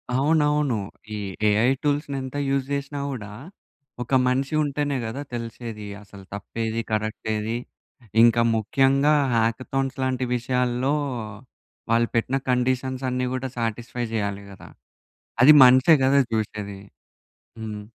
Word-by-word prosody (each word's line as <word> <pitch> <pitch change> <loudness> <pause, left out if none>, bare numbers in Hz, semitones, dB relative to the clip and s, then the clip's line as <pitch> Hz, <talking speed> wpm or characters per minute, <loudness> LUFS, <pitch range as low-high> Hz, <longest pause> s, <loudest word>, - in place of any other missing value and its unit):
అవునవును. 150 -2 +2 0.4
ఈ - - -4 0.3
ఏఐ 105 +3 +3 0.2
టూల్స్‌ని 145 -1 -1
ఎంత 130 +1 -7
యూజ్ 135 -1 0
జేశినా 140 0 -3
గూడా 110 -7 -6 0.7
ఒక 125 - -16 0.2
మనిషి 135 +3 0
ఉంటేనే 145 -1 -1
గదా! 115 +6 -5
తెలిసేది 115 -2 -6 0.2
అసలు 100 -1 -14
తప్పేది, 110 +3 -3
కరెక్టేది. 110 +1 -2 0.7
ఇంకా 120 0 +5
ముఖ్యంగా 135 +6 +3 0.2
హ్యాకథాన్స్ 130 +4 -1
లాంటి 130 -1 -1
విషయాల్లో 125 +2 0 1.0
వాళ్ళు 115 0 +3
పెట్టిన 125 +4 +1
కండిషన్స్ 130 +1 0
అన్నీ 125 0 -1
గూడా 130 0 -3
సాటిస్ఫై 120 +1 -3
చేయాలి 100 -2 -2
గదా! 95 - -13 0.7
అది 150 +4 +9
మనిషే 130 +5 +6
గదా! 140 +1 +4
జూశేది. 105 -2 -3 0.8
హ్మ్. 105 -2 -6
125 Hz, 115 wpm, -24 LUFS, 110-135 Hz, 1.0 s, అది